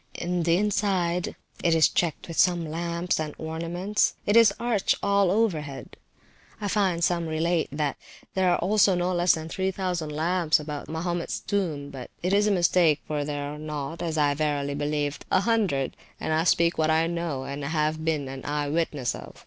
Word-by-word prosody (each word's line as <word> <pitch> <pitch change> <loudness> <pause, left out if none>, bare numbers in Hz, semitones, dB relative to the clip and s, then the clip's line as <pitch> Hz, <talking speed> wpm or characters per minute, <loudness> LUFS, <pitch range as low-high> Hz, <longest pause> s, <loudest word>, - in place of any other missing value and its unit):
In 175 0 -1
the 170 +1 +3
inside 190 -4 0 0.3
it 170 -1 +4
is 160 - +6
decked 170 -3 -1
with 165 - -6
some 175 -2 +3
lamps, 170 +2 -2
and 155 -1 -4
ornaments. 170 +6 -1
It 205 - +2
is 230 -1 +7
arched 230 -4 +1
all 200 -1 +3
over 200 -5 +2
head. 140 -2 -9 0.6
(I 205 - -2
find 190 -5 +1
some 170 -1 +1
relate, 160 +1 0
that 145 -1 -2 0.4
there 190 -1 +2
are 190 +4 +1 0.2
no 180 +1 0
less 175 0 +3
than 160 0 -6
3000 185 -2 -2
lamps 160 +2 +1
about 150 -1 -6
Mahomets 170 +2 -2
tomb; 160 -8 -2
but 130 -2 -8
it 180 +2 +1
is 205 +1 +4
a - - +3
mistake, 175 -4 +3
for 150 -1 -2
there 145 0 -3
are 150 - -8
not, 150 +1 -5
as 160 -2 -2
I 145 -1 +3
verily 145 -1 -1
believe, 145 0 -1
an - - +3
hundred; 200 - +1 0.2
and 160 - -1
I 160 +1 +1
speak 170 -1 +3
what 155 0 +2
I 160 +1 +3
know, 170 -5 -3
and 140 +1 -5
have 155 +1 -1
been 155 -4 0
an 135 0 -7
eye 145 0 -2
witness 145 -6 -1
of). - - -10
165 Hz, 185 wpm, -26 LUFS, 150-180 Hz, 0.6 s, is